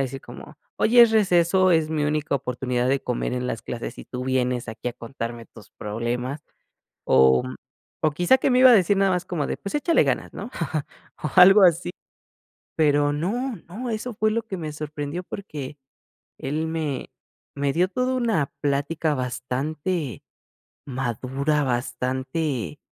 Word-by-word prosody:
a - - +3
decir 135 0 -5
como: 135 +5 -12 0.2
"Oye, 240 +2 +6
es 235 - +6
receso, 185 -2 +4
es 160 -2 +3
mi 155 -1 0
única 150 -1 0
oportunidad 125 -1 -1
de 135 0 +2
comer 125 0 -2
en 125 0 -2
las 115 - -4
clases 120 - -6
y - - -8
tú 125 0 -6
vienes 125 -2 0
aquí, 110 +2 -4
a - - -5
contarme 115 -1 -6
tus 105 -3 -16
problemas". 120 +6 -4 0.6
O 65 - +5 0.6
o 155 - +3
quizá 175 - +3
que - - +1
me 250 0 +4
iba 260 -1 +9
a - - +8
decir 195 0 +4
nada 195 -1 +3
más 180 0 -1
como 155 -6 -2
de: - - -3
"Pues 200 - -7
échale 325 +3 +3
ganas", - - -1
¿no?, - - -7 0.7
o 155 - -2
algo 195 +3 +9
así. 175 0 +3 0.9
Pero 145 -2 +3
no, 225 - -2
no, 235 +7 -5
eso 225 +2 -4
fue 215 +1 +1
lo 230 +1 0
que 190 - -4
me 155 -3 -5
sorprendió, 150 +2 -5
porque 150 -9 -7 0.6
él 150 +4 -2
me 155 -4 -3 0.4
me 140 -1 0
dio 175 +5 +2
toda 255 +4 -1
una 225 - 0
plática 145 +2 0
bastante 140 +4 -3 0.6
madura, 135 +3 -1
bastante, 130 - -2
150 Hz, 160 wpm, -24 LUFS, 125-180 Hz, 0.9 s, iba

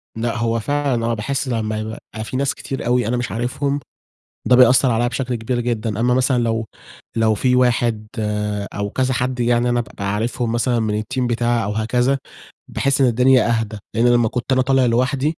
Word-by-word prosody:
لأ، 115 +1 -2
هو 115 +1 0
فعلًا 135 -1 -1
آه 115 - 0
باحس 135 +6 -2
لمّا 110 -3 -2
يبقى 110 0 -7
في 130 - -4
ناس 140 +1 0
كتير 135 - -6
أوي 120 -1 +1
أنا 125 +2 0
مش 120 -5 -3
عارفهم، 130 +6 -1 0.7
ده 125 - +6
بيأثر 125 +1 +5
عليّا 120 +1 +1
بشكل 125 0 -2
كبير 120 +2 -2
جدًا، 115 -3 -2
أمّا 125 +2 +2
مثلًا 130 0 +2
لو 115 -1 -1 0.5
لو 110 -1 +3
في 125 +4 +1
واحد 120 -3 +1
آآ 105 -1 -2
أو 100 0 -3
كذا 130 +4 0
حد 125 +1 -2
يعني 120 0 +2
أنا 120 0 +1
بابقى 100 -3 -5
عارفهم 115 +2 -1
مثلًا 120 +1 +1
من 105 -1 -1
الteam 130 +4 -4
بتاعي 120 -1 0
أو 100 - -2
هكذا، 120 +5 +1 0.5
باحس 140 0 0
إن 130 - +5
الدنيا 125 +1 +4
أهدى، 110 -1 -4 0.2
لأن 115 +2 +3
لمّا 120 -1 +4
كنت 125 +3 -4
أنا 130 0 +4
طالع 135 0 +3
لوحدي، 130 +6 +1
120 Hz, 195 wpm, -20 LUFS, 110-130 Hz, 0.7 s, ده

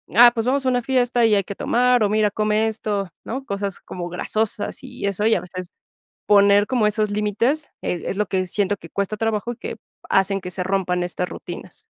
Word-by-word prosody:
"Ah, 240 +1 +9
pues, 225 0 -2
vamos 270 +1 +1
a - - +3
una 245 -1 +1
fiesta 245 -1 +2
y 220 -2 +4
hay 200 - +2
que 200 - -7
tomar, 245 -1 +3
o, 205 - +2
mira, 210 -1 +2
come 215 +1 +1
esto", 205 -3 -2
¿no? 265 +3 -5
Cosas 200 -1 -3
como 175 -1 -6
grasosas 210 +4 -2
y 255 -5 -6
eso, 200 +2 +1
y 225 - +4
a - - -1
veces 180 0 -7 0.6
poner 200 0 +5
como 235 -4 +2
esos 210 0 +1
límites, 215 +9 0
e 175 - -2
es - - -2
lo 210 0 +1
que 185 0 -1
siento 205 +2 0
que 165 - -13
cuesta 200 +1 -2
trabajo, 225 +2 -1
y - - -10
que - - -6 0.3
hacen 195 0 +2
que 180 - -6
se 180 0 -2
rompan 180 -2 0
estas 180 0 -2
rutinas. - - -9
210 Hz, 215 wpm, -22 LUFS, 195-230 Hz, 0.6 s, Ah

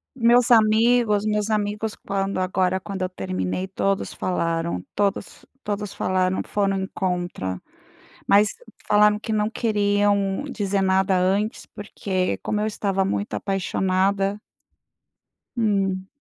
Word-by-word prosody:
Meus 240 0 +4
amigos 220 -1 +4
meus 210 0 0
amigos 210 0 -1
quando 195 -1 -2
agora 185 0 +1
quando 195 0 -6
eu 185 - -1
terminei, 95 - -3
todos 195 +1 -1
falaram, 165 - -2
todos 200 -1 -2 0.2
todos 205 -1 -3
falaram, 185 0 0
foram 195 -1 0
em 190 - -3
contra, 175 - -3 0.7
mas 205 +1 +5 0.4
falaram 210 0 +4
que 220 - -6
não 210 0 +1
queriam 205 -2 +1
dizer 200 -3 -1
nada 190 0 +2
antes, 195 +4 0
porque 190 -2 -3
como 210 - -2
eu 210 - 0
estava 195 -2 -1
muito 200 +1 -2
apaixonada 195 +1 0 1.2
Hum. 195 -4 0
200 Hz, 120 wpm, -23 LUFS, 190-210 Hz, 1.2 s, mas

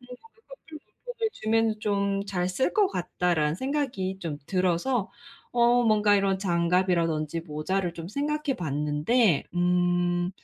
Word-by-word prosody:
'커플 325 - -14
물품을 485 -2 -5
주면 220 0 0
좀 200 -1 0
잘 180 -2 -1
쓸 185 +8 0
것 415 -3 +4
같다.'라는 175 - -1
생각이 245 - -2
좀 160 -5 -4
들어서 185 +5 0 0.4
어 240 0 +4
뭔가 210 -2 +4
이런 195 -1 +1
장갑이라든지 170 -3 0
모자를 170 +3 -2
좀 165 0 -7
생각해 290 +3 -2
봤는데 150 - +1
음 175 0 +1
190 Hz, 255 characters per minute, -26 LUFS, 175-240 Hz, 0.4 s, 것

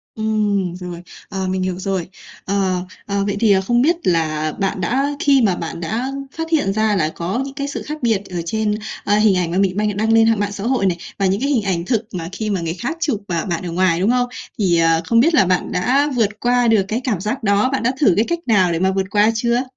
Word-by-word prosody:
Ừm, 210 -4 0
rồi, 175 -1 -7 0.3
ờ, 190 -1 -3
mình 185 0 -1
hiểu 185 -1 -2
rồi. 190 -2 -2 0.4
Ờ, 190 -2 0 0.2
ờ, 200 -1 -1
vậy 200 0 -1
thì 210 -4 +5
không 240 +3 +2
biết 335 +4 +3
là 155 -3 +1
bạn 195 -1 -1
đã 260 +10 +1
khi 275 -3 +4
mà 190 -5 +2
bạn 165 0 -5
đã 220 +9 -2 0.3
phát 325 0 -4
hiện 290 -12 +2
ra 215 -1 +1
là 155 -3 +1
có 180 +9 -3
những 275 0 -8
cái 280 +1 -3
sự - - -5
khác 305 +1 -6
biệt 220 -4 +1
ở 175 -2 -3
trên, 215 +2 0 0.3
ờ, 205 +1 +2
hình 210 -3 +4
ảnh 175 -2 0
mà 180 - -1
mình 195 -1 +1
bạn 210 -1 0
đăng 220 +2 +1
lên 225 0 +5
hạng 225 -2 +3
mạng 205 0 -1
xã 200 +1 -6
hội 245 -6 +1
này, 175 -2 0 0.2
và 195 - +1
những 195 +4 +1
cái 280 - 0
hình 240 -7 +2
ảnh 180 -4 -1
thực 225 0 -1
mà 165 -2 -4
khi 215 +1 -3
mà 190 -3 0
người 165 0 -3
khác 245 - -4
chụp, 280 -11 0
à, 170 -2 -1
bạn 175 -1 -2
ở - - -3
ngoài, 175 -1 +1
đúng 205 +5 +2
không, 245 0 +1 0.3
thì, 175 -5 +2
ờ, 165 0 +3
không 230 +5 +3
biết 325 +5 +3
là 195 - +5
bạn 180 0 0
đã 270 +10 +2
vượt 210 -3 0
qua 245 -1 +2
được 220 -3 +4
cái 230 +3 -1
cảm 215 -9 -1
giác 225 +6 -3
đó 200 +4 +2
bạn 270 - 0
đã 250 +2 +2
thử 220 -11 +5
cái 220 - +3
cách 340 0 0
nào 190 -6 +3
để 165 - 0
mà 190 +1 +2
vượt 190 0 -1
qua 210 +1 +4
chưa? 235 +2 +1
205 Hz, 265 wpm, -19 LUFS, 185-235 Hz, 0.4 s, thì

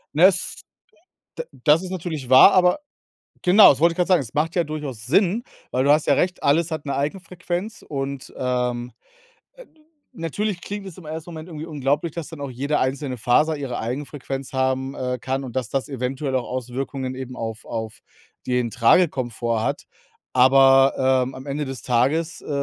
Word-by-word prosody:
Ne, 165 +4 +6
es 185 -1 +1 0.8
d 485 - -3 0.2
das 155 +2 +5
ist 185 - -6
natürlich 160 -8 -5
wahr, 130 +9 +9
aber 180 +5 +4 0.6
genau, 195 +4 +8
das 135 - +3
wollte 170 +2 +4
ich - - -17
grad 180 - +1
sagen. 185 -4 +4
Es 115 -5 -9
macht 155 +3 0
ja 175 - +3
durchaus 150 -8 -6
Sinn, 195 - +2 0.3
weil 130 - +1
du 140 - +4
hast 150 +1 +3
ja - - +5
recht, 180 0 0
alles 160 +4 +2
hat 155 -2 -4
'ne 140 - -2
Eigenfrequenz 180 +6 -4
und, 135 -2 -5
ähm, 125 -1 -2 0.6
äh, - - -14 0.5
natürlich 180 +4 -3
klingt 205 +1 -6
es 185 - -10
im 180 - -12
1. 160 +2 -6
Moment 160 -1 -8
irgendwie 160 -1 -7
unglaublich, 145 +2 -1
dass 170 -3 -5
dann 160 -3 -9
auch 140 - -4
jede 140 +4 -1
einzelne 130 0 -2
Faser 150 +8 +2
ihre 135 -4 -4
Eigenfrequenz 135 +2 -5
haben, 130 +1 -1
äh, 125 -1 -3
kann 135 +2 -2
und 130 -2 -8
dass 130 -4 -2
das 135 -1 -2
eventuell 135 +1 -3
auch 125 - 0
Auswirkungen 130 +1 -4
eben 130 -1 -7
auf 110 -2 -6
auf 110 -1 -5 0.5
den 125 -2 0
Tragekomfort 120 - +2
hat. - - -2 0.5
Aber, 135 +1 +6 0.3
ähm, 130 +1 -6
am 130 +2 -9
Ende 145 +1 -3
des 135 -2 -6
Tages, 145 +8 0
äh, - - -11
140 Hz, 185 wpm, -22 LUFS, 130-165 Hz, 0.8 s, wahr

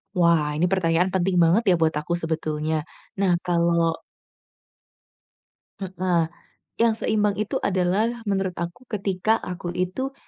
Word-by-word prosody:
Wah, 165 -4 +3
ini 165 - +2
pertanyaan 180 -1 +2
penting 190 0 0
banget 180 +8 +4
ya 185 - +6
buat 160 - +4
aku 150 +3 -3
sebetulnya. 160 -2 -2 0.4
Nah, 190 -3 +3
kalau 170 -1 +1 1.8
Heeh, 180 -3 0 0.5
yang 230 -1 +3
seimbang 210 -2 +1
itu 215 +1 -2
adalah 200 +5 0
menurut 195 -2 0
aku 175 +9 -6
ketika 205 0 0
aku 180 -1 -5
itu 185 +10 -2
180 Hz, 125 wpm, -24 LUFS, 170-200 Hz, 1.8 s, ya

